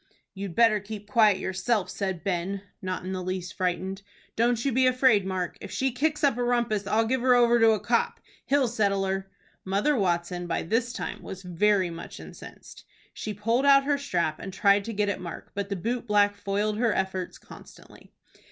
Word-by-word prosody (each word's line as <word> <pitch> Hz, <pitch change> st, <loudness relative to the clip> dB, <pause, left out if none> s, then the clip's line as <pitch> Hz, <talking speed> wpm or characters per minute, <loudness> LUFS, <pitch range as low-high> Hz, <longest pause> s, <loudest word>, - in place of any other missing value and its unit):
"You'd 195 Hz, -3 st, -6 dB
better 225 Hz, -2 st, +5 dB
keep 205 Hz, 0 st, -8 dB
quiet 210 Hz, -3 st, +5 dB
yourself," 190 Hz, +3 st, -1 dB
said 190 Hz, -5 st, -3 dB
Ben, 190 Hz, +1 st, -2 dB, 0.2 s
not 185 Hz, -1 st, -4 dB
in 185 Hz, -, -4 dB
the 185 Hz, -, -3 dB
least 185 Hz, 0 st, -4 dB
frightened. 185 Hz, +1 st, -2 dB, 0.3 s
"Don't 235 Hz, +1 st, +1 dB
you 275 Hz, -, +2 dB
be 260 Hz, +1 st, +3 dB
afraid, 255 Hz, -6 st, +3 dB
Mark. 185 Hz, -2 st, -3 dB
If -, -, -7 dB
she 265 Hz, 0 st, -1 dB
kicks 300 Hz, +5 st, -1 dB
up 275 Hz, -4 st, +3 dB
a -, -, +1 dB
rumpus, 235 Hz, -4 st, 0 dB
I'll 225 Hz, +2 st, +2 dB
give 255 Hz, +2 st, 0 dB
her 250 Hz, 0 st, +5 dB
over 240 Hz, -1 st, +4 dB
to 225 Hz, -1 st, +6 dB
a 215 Hz, -, -1 dB
copp. -, -, 0 dB, 0.3 s
He'll 280 Hz, -2 st, +3 dB
settle 200 Hz, -4 st, +1 dB
her." 195 Hz, 0 st, -3 dB, 0.3 s
Mother 200 Hz, +10 st, +1 dB
Watson 175 Hz, -3 st, -1 dB
by 170 Hz, -, -1 dB
this 230 Hz, +7 st, 0 dB
time -, -, -5 dB
was 190 Hz, 0 st, -8 dB
very 185 Hz, +1 st, +1 dB
much 165 Hz, 0 st, -9 dB
incensed. -, -, -12 dB, 0.3 s
She 215 Hz, -, -5 dB
pulled 230 Hz, +6 st, +1 dB
out 275 Hz, -1 st, +6 dB
her 285 Hz, 0 st, 0 dB
strap, 170 Hz, -, -1 dB
and 195 Hz, -, -7 dB
tried 200 Hz, +1 st, +3 dB
to 230 Hz, -, -4 dB
get 205 Hz, 0 st, 0 dB
at 195 Hz, -2 st, -2 dB
Mark, 175 Hz, -2 st, -8 dB
but 200 Hz, 0 st, -4 dB
the 200 Hz, -, -2 dB
boot 235 Hz, +6 st, -3 dB
black 205 Hz, -1 st, +3 dB
foiled 205 Hz, +1 st, -1 dB
her 235 Hz, -2 st, +2 dB
efforts 190 Hz, -1 st, -2 dB
constantly. -, -, -15 dB
205 Hz, 200 wpm, -27 LUFS, 190-235 Hz, 0.3 s, to